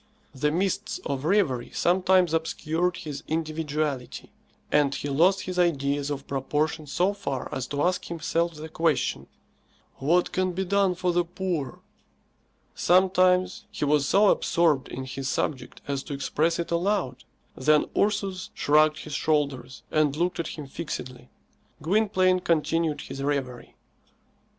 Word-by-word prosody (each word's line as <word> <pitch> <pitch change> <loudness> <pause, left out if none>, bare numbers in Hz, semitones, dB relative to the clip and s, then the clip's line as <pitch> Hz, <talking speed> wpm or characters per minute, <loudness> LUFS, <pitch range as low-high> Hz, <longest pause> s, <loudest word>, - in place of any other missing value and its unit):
The 145 +2 0
mists 185 +4 -1
of 140 0 -3
reverie 160 - +1
sometimes 185 -1 +3
obscured 165 +2 0
his 150 -5 -6
individuality, 155 -4 -3 0.4
and 140 -2 +3
he 145 - -4
lost 180 +7 +3
his 185 -1 -4
ideas 145 -4 +1
of 140 -1 -4
proportion 150 +3 -2
so 180 +7 +1
far 140 -11 -4
as 130 -1 -3
to 145 0 -2
ask 180 +1 0
himself 170 0 -1
the 155 +1 -7
question, 160 -2 0 0.7
"What 170 +6 +2
can 185 0 0
be 190 +2 -2
done 195 -1 +2
for 180 0 0
the 175 0 +3
poor?" 175 -6 -4 0.9
Sometimes 185 0 +3
he - - -3
was 145 -1 +2
so 205 +1 +5
absorbed 160 -6 +2
in 130 - -6
his 135 0 -4
subject 135 -4 -3
as 140 -1 -2
to 145 - -4
express 155 +4 0
it 170 - -4
aloud. 170 -7 0 0.3
Then 150 +3 +3
Ursus 200 -3 0
shrugged 155 +1 +3
his 150 - -8
shoulders 140 -5 -1
and 150 -2 +2
looked 175 +3 -1
at 165 - -2
him 150 - -6
fixedly. 130 -4 -7 0.5
Gwynplaine 185 +1 +2
continued 165 -2 0
his 135 - -7
reverie. 135 -3 -3
160 Hz, 140 wpm, -26 LUFS, 140-180 Hz, 0.9 s, so